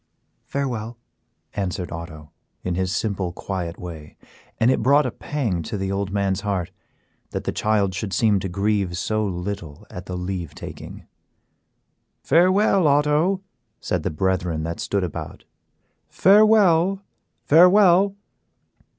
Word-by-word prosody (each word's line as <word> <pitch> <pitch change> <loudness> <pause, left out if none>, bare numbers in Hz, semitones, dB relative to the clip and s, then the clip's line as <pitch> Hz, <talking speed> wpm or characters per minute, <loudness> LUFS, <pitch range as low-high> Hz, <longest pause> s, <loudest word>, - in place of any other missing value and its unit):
"Farewell," 120 -5 -3 0.6
answered 90 -3 -3
Otto, 80 -3 -8 0.3
in 90 - -2
his 95 +1 -1
simple, 100 -4 -2
quiet 90 -2 -5
way, 80 -4 -9 0.4
and 115 +3 +4
it - - +1
brought 140 +5 +4
a 125 - -1
pang 115 - -3
to 90 +6 -5
the 95 0 -3
old 100 0 -2
man's 100 -1 0
heart 100 -5 -2 0.6
that - - -4
the - - -2
child 105 -3 +1
should 100 +1 -4
seem 105 +1 +2
to 95 - -4
grieve 100 -1 -1
so 110 +3 -1
little 90 -5 -5
at 90 +1 -8
the 90 - -4
leave 90 -3 -5
taking. - - -9 1.2
"Farewell, 185 +2 +4
Otto," 150 +6 +2 0.4
said 90 - -2
the - - -2
brethren 90 -1 -1
that 85 +1 -4
stood 100 -2 -1
about, 90 - -6 0.7
"farewell, 195 -2 +4 0.4
farewell." 185 +3 +6
100 Hz, 130 wpm, -22 LUFS, 90-145 Hz, 1.2 s, farewell